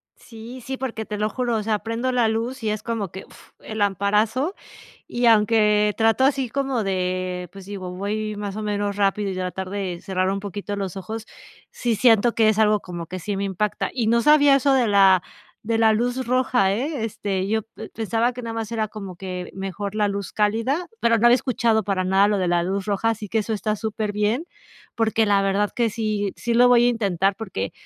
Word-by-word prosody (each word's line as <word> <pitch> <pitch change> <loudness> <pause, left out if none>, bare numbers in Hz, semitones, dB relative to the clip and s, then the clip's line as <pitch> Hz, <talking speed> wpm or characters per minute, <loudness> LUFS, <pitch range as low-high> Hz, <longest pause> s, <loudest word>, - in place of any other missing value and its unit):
Sí, 235 +2 -11
sí, 265 +3 -5
porque 235 -4 -4
te 210 - -5
lo 210 +1 0
juro, 245 0 -1
o 215 - -2
sea, 215 -1 0
prendo 230 +4 -2
la 245 -2 +2
luz 230 +4 -2
y 220 - 0
es 215 0 -3
como 225 -5 -3
que, 190 - -7
fff, - - -18
el 220 0 -7
lamparazo 210 - +1 0.5
y 240 0 0
aunque 210 -1 +4
trato 225 +3 +3
así 270 -2 +2
como 270 -2 -1
de, 185 -2 -2
pues, 195 -1 -11
digo 190 -2 -6
voy 210 +3 -3
más 205 -1 -5
o 215 - -4
menos 205 -1 -1
rápido 200 0 +1
y - - -5
tratar 185 0 -4
de 190 -3 -4
cerrar 185 -1 -1
un 195 +1 -1
poquito 205 +1 -5
los 195 -2 -4
ojos, 220 +3 -6 0.4
sí, 235 -2 -1
siento 230 0 +4
que 220 -1 +4
es 215 - +1
algo 215 -1 +4
como 175 -3 -7
que 185 +3 -6
sí 200 +3 -3
me 200 - -2
impacta 200 +1 -2
y 235 -4 -1
no 235 +1 +3
sabía 290 +1 +6
eso 275 0 +3
de 255 -3 +3
la 195 -3 +5 0.4
de 225 +1 0
la 220 -1 +4
luz 245 +3 -1
roja, 245 -6 +2
eh, 260 +2 -2
este, 195 -3 -3
yo 220 +2 +1
p 220 0 -11
pensaba 225 +2 -1
que 250 - -7
nada 230 -1 -5
más 225 -2 -4
era 220 -2 -1
como 195 -4 -8
que 180 0 -6
mejor 195 +1 -5
la 210 -1 +2
luz 200 -2 -5
cálida, 230 +11 0
pero 230 0 +3
no 225 - +2
había 240 - +7
escuchado 230 -3 +1
para 195 -2 0
nada 190 +2 +4
lo 205 -1 +1
de 185 -2 0
la 175 0 +2
luz 195 +2 -2
roja, 210 +3 0
así 215 -2 -6
que 225 - 0
eso 220 +1 -1
está 215 0 -1
súper 215 0 -3
bien, 210 +9 0 0.5
porque 225 0 +1
la 200 -1 +3
verdad 195 +1 +1
que 235 -2 +1
sí 210 -3 -2
sí, 235 - -2
lo 245 +1 +6
voy 240 -1 +5
a - - +5
intentar 195 -4 0
porque, 180 - -4
215 Hz, 220 wpm, -23 LUFS, 195-230 Hz, 0.5 s, había